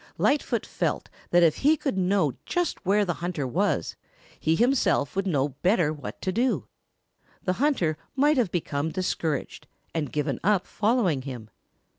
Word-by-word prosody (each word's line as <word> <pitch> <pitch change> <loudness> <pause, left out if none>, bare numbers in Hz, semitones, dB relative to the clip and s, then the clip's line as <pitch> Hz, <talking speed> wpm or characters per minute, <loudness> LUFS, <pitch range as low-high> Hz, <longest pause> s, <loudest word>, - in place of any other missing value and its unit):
Lightfoot 290 +1 +1
felt - - -2 0.2
that 175 0 +5
if 160 -3 +4
he 305 +3 +4
could 275 -6 -2
know 185 -6 +2
just 355 -2 -1
where 205 +1 +4
the 175 - 0
hunter 170 -5 -2
was, 125 - 0 0.4
he 160 +1 +2
himself 235 - +2
would 195 0 0
know 145 -5 +1
better 180 -5 +3
what 150 - -8
to 185 - 0
do. 240 +6 0 0.8
The 185 - +1
hunter 175 - +1 0.2
might 295 +2 +3
have 235 -7 +2
become 155 -3 -1
discouraged 165 -4 -2 0.3
and 155 -3 -2
given 150 -1 -1
up 200 -1 +2
following 210 - +1
him. 125 -5 -8
180 Hz, 155 wpm, -26 LUFS, 150-225 Hz, 0.8 s, that